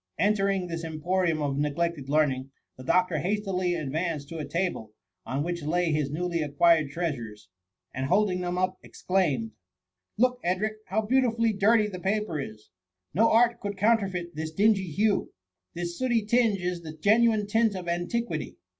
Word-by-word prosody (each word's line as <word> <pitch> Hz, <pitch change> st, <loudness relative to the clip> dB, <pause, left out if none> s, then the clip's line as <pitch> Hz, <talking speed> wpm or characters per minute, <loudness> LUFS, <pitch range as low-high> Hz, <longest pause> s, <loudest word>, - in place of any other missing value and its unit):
Enter 200 Hz, -1 st, +2 dB
ing 195 Hz, -2 st, 0 dB
this 165 Hz, -1 st, -5 dB
emporium 165 Hz, 0 st, 0 dB
of 140 Hz, -1 st, -1 dB
neglected 150 Hz, -1 st, -1 dB
learning, 140 Hz, -3 st, +1 dB, 0.3 s
the 130 Hz, -, -11 dB
doctor 180 Hz, +3 st, +2 dB
hastily 185 Hz, 0 st, -1 dB
advanced 155 Hz, -1 st, -3 dB
to 165 Hz, -, -6 dB
a 150 Hz, -, -3 dB
table, 165 Hz, -, -2 dB, 0.3 s
on 135 Hz, +3 st, -1 dB
which 170 Hz, +1 st, -3 dB
lay 165 Hz, +3 st, 0 dB
his 150 Hz, -2 st, 0 dB
newly 170 Hz, +2 st, -2 dB
acquired 155 Hz, +1 st, +3 dB
treasures, 120 Hz, -, -4 dB, 0.4 s
and 130 Hz, +1 st, -2 dB
holding 190 Hz, +1 st, +2 dB
them 180 Hz, 0 st, -2 dB
up, 185 Hz, 0 st, -1 dB
exclaimed, 150 Hz, -12 st, -1 dB
^* -, -, -26 dB, 0.7 s
Look, 250 Hz, +2 st, +2 dB
Edric, 205 Hz, +5 st, -1 dB
how 215 Hz, +4 st, 0 dB
beau 260 Hz, +5 st, +3 dB
tifully 230 Hz, -2 st, +1 dB
dirty 215 Hz, +2 st, +4 dB
the 195 Hz, -3 st, -6 dB
paper 200 Hz, -3 st, -1 dB
is; 110 Hz, -5 st, -8 dB, 0.4 s
no 220 Hz, +8 st, +4 dB
art 235 Hz, +1 st, +4 dB
could 205 Hz, -2 st, -5 dB
counter 215 Hz, 0 st, +3 dB
feit 175 Hz, -2 st, -5 dB
this 155 Hz, +1 st, -4 dB
dingy 195 Hz, +1 st, +2 dB
hue. 205 Hz, +6 st, 0 dB, 0.4 s
This 175 Hz, +4 st, -5 dB
sdbty 235 Hz, -5 st, +1 dB
tinge 230 Hz, -3 st, +3 dB
is 175 Hz, -1 st, -2 dB
the 155 Hz, -1 st, -9 dB
genuine 215 Hz, +4 st, +3 dB
tint 220 Hz, 0 st, +2 dB
of 180 Hz, -2 st, -6 dB
antiquity. 175 Hz, +8 st, -2 dB
180 Hz, 170 wpm, -27 LUFS, 155-210 Hz, 0.7 s, dirty